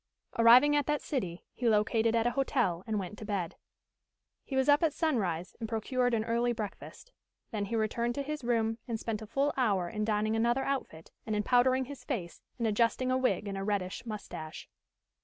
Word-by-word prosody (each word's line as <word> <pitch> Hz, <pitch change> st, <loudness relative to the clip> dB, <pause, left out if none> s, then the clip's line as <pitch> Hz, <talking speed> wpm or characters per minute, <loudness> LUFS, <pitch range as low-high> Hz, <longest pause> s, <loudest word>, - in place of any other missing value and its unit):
Arriving 250 Hz, +6 st, +7 dB
at 290 Hz, -2 st, +1 dB
that 295 Hz, -1 st, +1 dB
city, 185 Hz, -, -4 dB
he 245 Hz, -2 st, 0 dB
located 220 Hz, +1 st, +2 dB
at 230 Hz, 0 st, +2 dB
a 240 Hz, -, +3 dB
hotel, 240 Hz, -, 0 dB
and 220 Hz, -1 st, 0 dB
went 195 Hz, +1 st, -5 dB
to -, -, -7 dB
bed. 200 Hz, -5 st, -3 dB, 0.9 s
He 270 Hz, -, -5 dB
was 265 Hz, 0 st, +2 dB
up 290 Hz, 0 st, +5 dB
at 320 Hz, -3 st, +2 dB
sunrise 190 Hz, -, -1 dB
and 225 Hz, -2 st, -4 dB
procured 245 Hz, +2 st, 0 dB
an 220 Hz, -, 0 dB
early 235 Hz, +1 st, +1 dB
breakfast. 220 Hz, -, -7 dB, 0.4 s
Then 210 Hz, -2 st, -2 dB
he 230 Hz, -, -3 dB
returned 235 Hz, +2 st, 0 dB
to 280 Hz, -, -2 dB
his 300 Hz, -1 st, -5 dB
room 225 Hz, -1 st, +1 dB
and 230 Hz, -2 st, -2 dB
spent 220 Hz, -1 st, -3 dB
a 220 Hz, -, -8 dB
full 275 Hz, +6 st, +1 dB
hour 200 Hz, -9 st, +1 dB
in 215 Hz, +4 st, -3 dB
donning 215 Hz, 0 st, +1 dB
another 240 Hz, +4 st, +2 dB
outfit 260 Hz, -13 st, -4 dB, 0.2 s
and 215 Hz, -, 0 dB
in 210 Hz, -, 0 dB
powdering 255 Hz, +3 st, +3 dB
his 265 Hz, -1 st, -9 dB
face, 195 Hz, -11 st, -4 dB, 0.2 s
and 235 Hz, -, -1 dB
adjusting 230 Hz, +4 st, +1 dB
a 255 Hz, -, +3 dB
wig 250 Hz, -4 st, +1 dB
and 195 Hz, -1 st, -3 dB
a -, -, -3 dB
reddish 195 Hz, -2 st, -2 dB
moustache. 210 Hz, -8 st, -7 dB
230 Hz, 200 wpm, -31 LUFS, 210-255 Hz, 0.9 s, Arriving